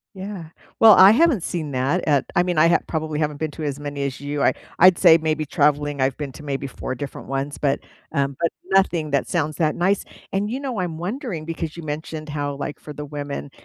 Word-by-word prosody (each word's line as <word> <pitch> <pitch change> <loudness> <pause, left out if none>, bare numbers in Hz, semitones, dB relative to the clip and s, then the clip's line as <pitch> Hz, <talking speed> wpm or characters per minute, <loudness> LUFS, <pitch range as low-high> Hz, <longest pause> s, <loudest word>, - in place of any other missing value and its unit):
Yeah. 190 -2 -6 0.3
Well, 225 -1 +9
I 190 +1 +9
haven't 265 - +3
seen 160 -5 -3
that 135 +7 0
at 140 -3 +3
I 175 - +5
mean, 180 -2 -1
I 160 +2 +6
ha - - +5
probably 155 -1 -2
haven't 150 -1 0
been 155 0 -3
to 155 - -7
as 145 -1 -3
many 145 -1 -4
as 135 -1 -4
you. 145 0 -3
I - - +4 0.3
I'd 180 0 +7
say 160 - +7
maybe 155 -1 -1
traveling, 145 0 +1
I've 130 0 +1
been 145 -3 -5
to 150 - -11
maybe 140 -1 -3
4 130 0 -5
different 140 +2 -7
ones, 135 +2 -3
but, 140 -1 0 0.3
um, 140 -1 0
but 170 - +2 0.2
nothing 175 -5 +2
that 140 -1 +1
sounds 155 -4 -1
that 155 -2 +1
nice. 190 +3 +1 0.3
And, 200 +2 -1
you 260 +4 -3
know, 260 -7 -3
I'm 175 -3 -3
wondering 195 - -4
because 165 -1 -5
you 170 - -8
mentioned 155 +1 -5
how, 145 -1 -3
like, 145 +1 -5
for 150 - -9
the 150 - -6
women, 145 -1 -5
155 Hz, 230 wpm, -22 LUFS, 145-175 Hz, 0.3 s, Well